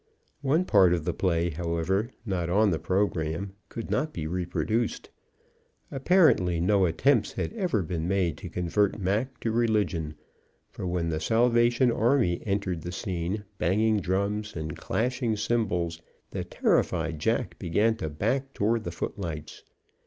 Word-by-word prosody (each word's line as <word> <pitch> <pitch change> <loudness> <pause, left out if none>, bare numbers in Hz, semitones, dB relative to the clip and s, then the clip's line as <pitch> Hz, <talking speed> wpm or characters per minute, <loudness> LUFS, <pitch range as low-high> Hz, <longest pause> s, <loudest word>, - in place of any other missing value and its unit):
One 150 +6 +2
part 95 - +5
of 85 -3 -4
the 90 - 0
play, 85 -2 0
however, 85 +6 -1 0.2
not 90 -5 -1
on 105 +3 +3
the 80 - 0
program, 95 -1 -1 0.2
could 115 - -6
not 155 +1 0
be 80 - -4
reproduced. 90 +7 -2 0.8
Apparently 135 - +3
no 95 +1 +3
attempts 120 - +2
had - - -3
ever 180 - 0
been 80 0 -3
made 90 -4 +1
to - - -7
convert 90 +3 0
Mac 105 +7 -1
to 115 - 0
religion, 105 -9 0 0.6
for 90 - -5
when 85 -2 -1
the 80 -1 -1
Salvation 120 +5 +3
Army 115 -7 +2
entered 95 -4 -1
the 90 - -5
scene, 95 +1 -3 0.2
banging 110 +4 +2
drums 100 +3 -1
and 80 -2 -4
clashing 120 -1 -1
cymbals, 90 -8 -1 0.3
the - - -3
terrified 80 -3 0
jack - - -1
began 105 +7 +2
to 80 - -3
back 130 - -1
toward 110 +2 +1
the - - -3
footlights. 80 -7 -5
95 Hz, 145 wpm, -27 LUFS, 85-115 Hz, 0.8 s, part